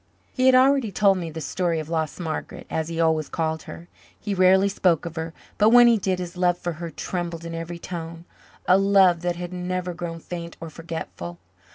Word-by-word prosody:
He 255 0 +2
had 260 - +7
already 260 -3 +4
told 195 0 +3
me 170 -2 -4
the 160 +1 -7
story 170 0 -1
of 155 - -6
"lost 160 -1 -2
Margaret," 160 -3 -5
as 160 -1 -1
he 165 0 -4
always 160 -2 +1
called 160 -1 -2
her. 170 - -9 0.3
He 205 - -3
rarely 190 +1 +5
spoke 180 -5 +1
of 165 -1 -6
her, 160 0 -4 0.3
but 210 +1 +6
when 240 +1 +8
he 235 -2 +5
did 190 -1 0
his 180 0 -6
love 180 -1 +2
for 175 -1 -4
her 170 - -4
trembled 170 -1 -5
in 165 - -6
every 165 +1 -5
tone 170 -1 -7 0.4
a 185 +2 +6
love 195 -3 +4
that 175 0 -1
had 175 +1 -6
never 180 0 -3
grown 165 -1 -6
faint 170 0 -7
or 165 -1 -8
forgetful. 160 - -7
175 Hz, 210 wpm, -24 LUFS, 165-185 Hz, 0.4 s, when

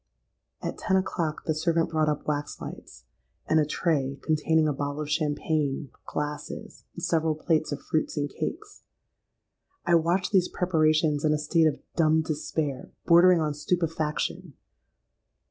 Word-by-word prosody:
"At - - -4
ten 190 -2 +2
o'clock 170 -4 -2
the 160 - +1
servant 165 +1 +1
brought 155 -1 +2
up 150 - -2
waxlights, 145 - -5 0.4
and 160 - +4
a 150 - +2
tray 140 -5 0
containing 160 0 +2
a 150 - +1
bottle 145 +2 -3
of 150 0 -4
champagne, 150 -2 -1 0.2
glasses, 150 0 -5
and - - -7
several 160 -1 +1
plates 155 0 0
of 145 - -4
fruits 155 0 -1
and 145 0 0
cakes. 415 - -6 1.0
I 175 - +2
watched 170 +3 +2
these 185 -3 +4
preparations 155 -4 +2
in 155 -1 +3
a - - +2
state 160 +2 +3
of 150 - -2
dumb 160 -1 +3
despair, 150 -3 -3 0.2
bordering 175 0 +6
on 150 -1 0
stupefaction. 160 0 -2
155 Hz, 145 wpm, -27 LUFS, 150-165 Hz, 1.0 s, bordering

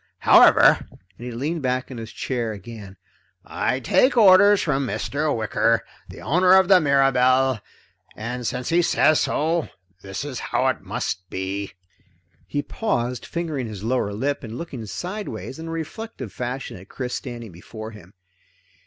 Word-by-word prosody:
However," - - +6
and - - -19 0.3
he - - -4
leaned 150 +8 -3
back 130 0 -2
in 125 - -7
his 110 -1 -8
chair 120 -3 -3
again, 100 -1 -10 0.5
"I 130 - -1
take 250 - +3
orders 205 -1 +7
from 140 -4 0
Mr. 150 +5 -2
Wicker, 110 -4 +1 0.3
the - - -11
owner 180 - +3
of 190 -1 +6
the 185 -1 +6
Mirabelle, 135 -3 +3 0.6
and 120 +2 -4
since 125 0 -3
he 170 +1 +3
says 155 -2 +3
so, 160 +1 0 0.3
this 95 +7 -6
is 135 -5 -5
how - - -1
it - - -2
must 90 0 -4
be." 95 +1 -4 0.7
He 145 +5 -2
paused, 125 - -2
fingering 155 -7 -3
his 105 -3 -8
lower 115 -3 0
lip 135 +8 -2
and 115 0 -7
looking 130 -10 -7
sideways 170 - -6
in 165 - -7
a - - -5
reflective 165 - -6
fashion 125 -3 -5
at 95 +2 -15
Chris 125 -2 -5
standing 120 -5 -6
before 110 +6 -9
him. 100 -3 -15
130 Hz, 155 wpm, -23 LUFS, 110-160 Hz, 0.7 s, orders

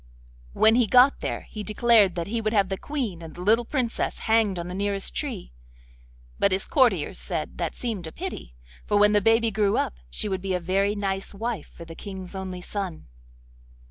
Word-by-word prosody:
When 220 - +5
he 240 -1 +3
got 255 +5 +5
there - - -3
he 215 - -8
declared 215 -2 +4
that 170 -1 -2
he 230 +4 -2
would 215 0 -1
have 200 -3 +3
the 195 - -2
Queen 245 - -3
and 160 -2 -10
the 175 - -8
little 225 +4 +3
Princess 245 -3 -1
hanged 220 -4 +3
on 170 0 -4
the 180 - -6
nearest 200 0 -1
tree; 250 - -4 0.9
but 200 - +3
his 190 +1 +1
courtiers 195 - +2
said 165 -5 -4
that 170 -3 -2
seemed 215 -9 -4
a - - -7
pity, - - -7 0.3
for 205 - +2
when 210 0 +5
the 210 0 +3
baby 225 +2 +3
grew 205 0 +1
up - - 0 0.2
she - - -3
would 190 -2 -2
be 190 -1 -1
a - - 0
very 195 +4 +1
nice 195 -1 -3
wife 225 -5 -3
for 170 - -12
the 165 - -9
King's 190 0 -8
only 190 -2 -5
son. 190 -3 -5
200 Hz, 205 wpm, -25 LUFS, 185-225 Hz, 0.9 s, When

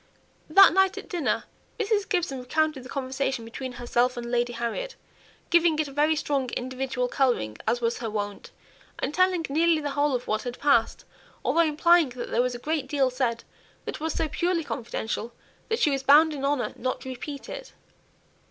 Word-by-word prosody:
That 390 +2 +8
night 385 0 +3
at - - -7
dinner, 350 -7 0 0.4
Mrs. 420 -2 0
Gibson 350 -9 -1
recounted 305 +3 0
the 255 - -12
conversation 265 -2 -2
between 250 +3 -6
herself 245 +1 0
and 235 0 -5
Lady 240 0 0
Harriet, 240 - -3 0.6
giving 340 -2 +4
it 310 -1 0
a - - -9
very 300 +3 +2
strong 275 -4 -1
individual 255 0 -2
colouring, 245 - 0
as 240 +2 +1
was 235 0 0
her 230 -2 -3
wont, 205 -1 -4 0.5
and - - -3
telling 365 -2 +2
nearly 320 +3 +3
the 290 -1 -3
whole 285 -1 +1
of 245 - -3
what 215 0 0
had 245 -1 -6
passed, 280 -6 +2 0.4
although 335 - +3
implying 330 0 +4
that 245 0 -7
there 235 - +3
was 250 0 -1
a - - -4
great 300 +3 -2
deal 270 -3 +1
said 245 -2 -1 0.4
which - - -5
was 320 +1 -2
so 325 - 0
purely 340 +3 0
confidential, 235 -3 -4 0.4
that 450 - +1
she 300 - +3
was 275 -1 0
bound 300 +4 +6
in 275 -2 -6
honour 280 -2 0
not 255 0 -2
to 260 - -7
repeat 275 +2 -7
it. - - -8
275 Hz, 190 wpm, -26 LUFS, 245-320 Hz, 0.6 s, That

